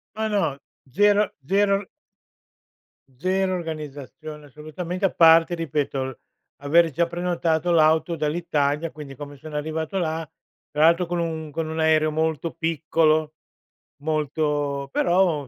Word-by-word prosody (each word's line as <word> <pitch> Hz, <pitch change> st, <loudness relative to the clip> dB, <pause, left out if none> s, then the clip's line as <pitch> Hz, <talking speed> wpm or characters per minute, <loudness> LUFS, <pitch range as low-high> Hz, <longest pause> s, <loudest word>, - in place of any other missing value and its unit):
Ma 220 Hz, 0 st, -1 dB
no, 165 Hz, -10 st, 0 dB, 0.3 s
zero 205 Hz, +6 st, +3 dB, 0.2 s
zero 200 Hz, +1 st, +2 dB, 1.3 s
zero 185 Hz, +3 st, 0 dB
organizzazione 150 Hz, -2 st, -7 dB
assolutamente, 155 Hz, +6 st, -5 dB
a -, -, +2 dB
parte, 165 Hz, +1 st, +6 dB
ripeto, 140 Hz, -5 st, -3 dB, 0.4 s
avere 165 Hz, +3 st, +4 dB
già 170 Hz, +4 st, +1 dB
prenotato 175 Hz, -1 st, 0 dB
l'auto 160 Hz, +1 st, +3 dB
dall'Italia, 150 Hz, -1 st, -1 dB
quindi, 145 Hz, -3 st, -10 dB
come 145 Hz, +1 st, -9 dB
sono 155 Hz, +1 st, -9 dB
arrivato 160 Hz, +4 st, -3 dB
là, 160 Hz, -2 st, -2 dB, 0.4 s
tra 150 Hz, -, +1 dB
l'altro 170 Hz, +2 st, +5 dB
con 175 Hz, 0 st, -2 dB
un 160 Hz, -2 st, -3 dB
con 160 Hz, +1 st, -3 dB
un 160 Hz, +1 st, -4 dB
aereo 155 Hz, -1 st, +3 dB
molto 160 Hz, +1 st, -1 dB
piccolo, 155 Hz, -1 st, +1 dB, 0.7 s
molto 145 Hz, -2 st, -1 dB
però, 175 Hz, -5 st, +2 dB
160 Hz, 120 wpm, -24 LUFS, 150-170 Hz, 1.3 s, parte